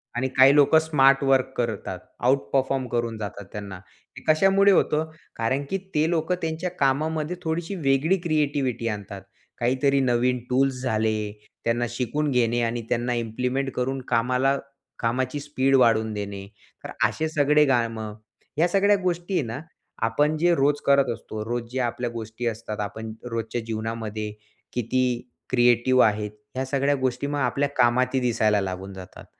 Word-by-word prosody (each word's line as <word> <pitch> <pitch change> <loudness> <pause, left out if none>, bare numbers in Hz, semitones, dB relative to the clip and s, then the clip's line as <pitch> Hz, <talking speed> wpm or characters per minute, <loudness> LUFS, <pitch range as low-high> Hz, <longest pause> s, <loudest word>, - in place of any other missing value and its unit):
आणि 130 +2 0
काही 135 +2 +7
लोकं 150 +2 +6
स्मार्ट 140 -3 +4
वर्क 135 -1 +2
करतात. 110 -6 -3 0.2
आउट 130 +3 +3
परफॉर्म 135 -1 +1
करून 115 -2 -2
जातात. 100 -1 -6
त्यांना 100 -2 -7 0.4
हे - - -10
कशामुळे 195 +5 +5
होतं? 160 -4 +2 0.3
कारण 130 +5 0
की 195 - 0 0.2
ते 155 +2 +3
लोकं 170 +1 0
त्यांच्या 160 +2 -2
कामामध्ये 155 +4 0
थोडीशी 165 +3 -2
वेगळी 155 +3 +2
क्रिएटिव्हिटी 145 -7 0
आणतात. 100 -2 -5 0.4
काहीतरी 130 +3 +2
नवीन 125 0 +2
टूल्स 130 0 +1
झाले, 110 -3 0 0.3
त्यांना 120 +1 +1
शिकून 130 +5 -1
घेणे 120 -1 +2
आणि 115 0 -1
त्यांना 120 +1 0
इम्प्लिमेंट 125 +4 -2
करून 130 +1 -1
कामाला 125 +3 +2 0.4
कामाची 130 +4 -1
स्पीड 135 -2 +1
वाढवून 110 -4 +3
देणे. 100 -1 -5 0.4
तर - - -7 0.2
असे 160 - -2
सगळे 150 0 +4
कामं, 115 -4 0 0.4
ह्या 165 +3 +4
सगळ्या 200 +3 +3
गोष्टी 175 +1 -2
आहे 180 - +2
ना 120 +4 -5 0.5
आपण 150 +7 +1
जे 175 +2 +3
रोज 145 0 +2
करत 140 -2 +4
असतो, 110 -1 -7
रोज 120 0 -3
जे 130 - -2
आपल्या 120 0 -1
गोष्टी 115 +1 -6
असतात. 110 -1 -4
आपण 110 +2 -5 0.2
रोजच्या 115 +1 -3
जीवनामध्ये 110 -1 -4 0.4
किती 125 +1 -1 0.2
क्रिएटिव्ह 120 +1 +4
आहेत, 105 -1 0 0.2
ह्या 130 +1 -1
सगळ्या 140 +1 +1
गोष्टी 130 0 -1
मग 145 0 -2
आपल्या 140 +2 0
कामातही 125 +2 +3
दिसायला 110 -4 +2
लागून 95 +1 -5
जातात. 95 -1 -11
125 Hz, 150 wpm, -24 LUFS, 115-145 Hz, 0.5 s, काही